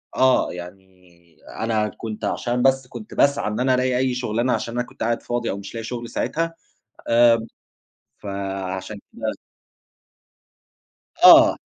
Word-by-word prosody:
آه. 130 -6 +3
يعني 90 +2 -9 0.7
أنا 110 -1 0
كنت 110 0 -6
عشان 120 0 -1
بس 135 -1 +2
كنت 120 -4 -10
باسعى 140 -4 +2
إن 105 +2 -3
أنا 130 0 +2
ألاقي 125 0 +1
أي 130 0 +1
شُغلانة 120 0 0
عشان 115 - -3
أنا 120 - -1
كنت 120 - -8
قاعد 115 0 0
فاضي 120 -1 -2
أو 100 - -3
مش 100 +2 -9
لاقي 115 - -4
شغل 120 +1 -6
ساعتها، 165 +1 -2 0.6
آمم 115 -1 +5 0.7
فعشان 95 0 -5
كده - - -3 1.9
آه. - - +9
115 Hz, 140 wpm, -22 LUFS, 105-125 Hz, 1.9 s, آه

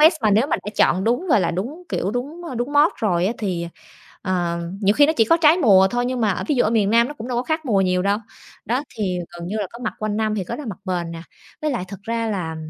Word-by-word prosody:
vest 320 +3 +7
mà 215 - +3
nếu 220 +7 +3
mà - - +1
đã 210 - -7
chọn 185 +3 +3
đúng, 245 +10 0
gọi 215 - +4
là, 170 - +1
đúng, 245 - -4
kiểu, 195 - -1
đúng, 285 +9 -5
a, 255 - -5
đúng 245 +5 -3
mode 295 +3 +4
rồi 180 -5 +1
á 220 - 0
thì, 180 -5 -2 0.6
ờ, 175 -3 -1 0.2
nhiều 200 +1 +3
khi 290 -1 +6
nó 315 - +2
chỉ 225 - +5
có 330 - +4
trái 320 0 +5
mùa 195 - +6
thôi, 245 0 0
nhưng 255 -1 -2
mà, 215 -2 +2
ờ, - - -4
ví 295 - +2
dụ 245 - +3
ở 215 - +1
miền 210 -3 +2
Nam 235 +2 +4
nó 295 - -7
cũng 250 -3 -8
đâu 245 - -2
có 245 - 0
khác 315 +3 -2
mùa 210 -7 +2
nhiều 180 -1 +1
đâu, 200 +1 +1 0.5
đó, 250 +5 0
thì 185 -4 -1
gần 175 0 -8
như 215 - -3
là 205 -3 -1
có 235 - -9
mặc - - -2
quanh 215 -1 -2
năm 215 -1 0
thì 195 -3 -2
có - - -5
là 295 -4 -7
mặc 200 -6 -6
bền 175 -3 -2
nè. 165 0 -7 0.4
Với 305 - 0
lại 235 -8 -2
thực 200 0 -9
ra 230 +2 -2
là, 165 -5 -3
215 Hz, 300 wpm, -21 LUFS, 185-255 Hz, 0.6 s, vest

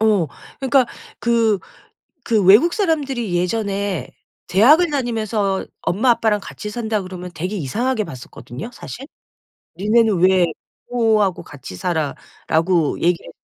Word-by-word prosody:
어 210 -6 +3 0.3
그러니까 265 -2 +3 0.3
그 230 -3 +2 0.6
그 220 -5 +1
외국사람들이 270 - +3
예전에 200 0 -1 0.4
대학을 300 - +5
다니면서 220 -7 -1
"엄마 220 +8 +1
아빠랑 220 -3 +2
같이 210 - -7
산다." 220 -1 -2
그러면 185 -1 -7
되게 180 +6 -3
이상하게 220 - -1
봤었거든요 130 - -9
사실. 270 +3 -9 0.7
"니네는 215 0 +3
왜 185 -1 +5 0.4
부모하고 220 -6 +2
같이 135 -10 -10
살아?"라고 160 - -1
얘기를 175 0 0
210 Hz, 290 characters per minute, -20 LUFS, 180-235 Hz, 0.7 s, 대학을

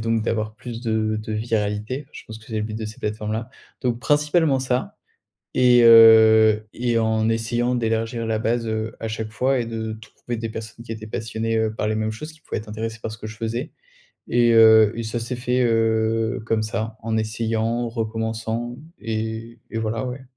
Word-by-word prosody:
donc 115 0 0
d'avoir 110 -1 -2
plus 115 0 -8
de 110 -1 0
de 110 +1 -5
viralité, 110 +4 -2
je - - -10
pense 110 0 -9
que 110 - -18
c'est 110 - -5
le - - -1
but 110 0 -4
de 110 - -4
ces 105 +1 -8
plateformes-là. 110 +2 -3 0.3
Donc 120 -2 -1
principalement 150 0 +2
ça 125 -1 -2 0.6
et, 125 -1 +6
heu, 110 -1 +7
et 120 -1 0
en 110 0 +1
essayant 120 +2 0
d'élargir 115 0 -1
la 110 -1 -1
base, 115 +1 0
heu, 110 +1 -3
à 115 - -4
chaque 110 0 -4
fois 130 +3 +1
et 120 - -1
de 110 -1 -4
trouver 110 +2 -7
des 115 0 -4
personnes 110 +1 -8
qui 115 - -9
étaient 110 -1 -6
passionnées 110 +1 -2
heu 110 -1 0
par 105 - -1
les 110 - 0
mêmes 110 0 -1
choses, 155 +9 -7
qui 155 - -21
pouvaient - - -4
être 105 0 -8
intéressées 110 +1 -5
par 110 - -4
ce 110 - -8
que 110 - -6
je 110 +1 -9
faisais. 115 +6 -3 0.6
Et 120 -1 +3
heu 110 -1 +7
et, 115 - -2
ça 110 +2 -3
s'est 120 +2 -4
fait, 125 +1 0
heu, 115 +1 +1
comme 110 -1 +1
ça. 110 0 -4
En 110 0 -1
essayant, 110 0 -1
en 120 +1 -1
recommençant 115 +1 -3 0.2
et 110 +1 -4
et, 115 - -3
voilà, 110 +3 -2
ouais. 125 +1 -6
115 Hz, 205 wpm, -23 LUFS, 110-120 Hz, 0.6 s, heu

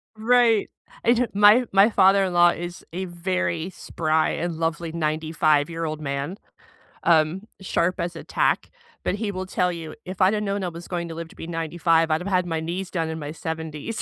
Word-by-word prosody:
Right. 230 -1 +3 0.3
I 235 - +5
don't 240 -2 -1
My 210 +5 +6
My 195 +3 +6
father-in-law 190 -3 +5
is 175 +1 -6
a 190 +1 -3
very 175 -1 -2
spry 160 -3 0
and 170 0 -3
lovely 165 0 -2
95 155 -1 +1
year 165 0 -3
old 155 0 -3
man, 140 +6 -3 0.7
um, 165 +3 +3 0.2
sharp 180 -1 0
as 170 0 -3
a - - -8
tack, - - 0 0.3
but 195 - 0
he 215 0 -3
will 185 0 -4
tell 180 -1 0
you, 160 -2 -7
"If 185 +1 -6
I'd 190 +3 +5
had 210 0 -1
known 200 -1 -2
I 180 - -1
was 170 +1 -10
going 170 -1 -3
to 165 - -6
live 165 0 -6
to - - -17
be 165 - -8
95, 165 0 +1
I'd 155 +2 +1
have 190 - -5
had 180 -2 +2
my 165 -2 -2
knees 180 +3 -4
done 165 -3 -2
in 160 0 -4
my 145 0 -5
70s." 160 +5 -5
175 Hz, 200 wpm, -24 LUFS, 160-190 Hz, 0.7 s, My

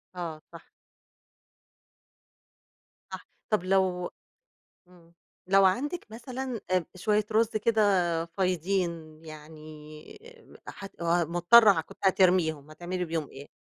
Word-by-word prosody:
آه، 165 -3 -6
صح. 170 - -10 2.5
صح، - - -9 0.2
طَب 215 -4 +1
لو 185 -2 0 0.8
امم، 170 -2 -22 0.3
لو 195 +1 +5
عندِك 285 - 0
مثلًا 245 +1 -6
أ 180 -3 +1
شوية 210 +2 0
رز 220 +1 +2
كده 220 0 +1 0.4
فايضين، 170 -3 -2
يعني 155 - -12 0.5
آآ، - - -6
حت 195 -3 -12
مضطرة 175 +4 +4
كنتِ - - -16
هترميهم، 175 -6 +2
هتعملي 175 +3 -4
بيهم 160 -3 -4
إيه؟ 140 +1 -12
180 Hz, 100 wpm, -27 LUFS, 160-200 Hz, 2.5 s, لو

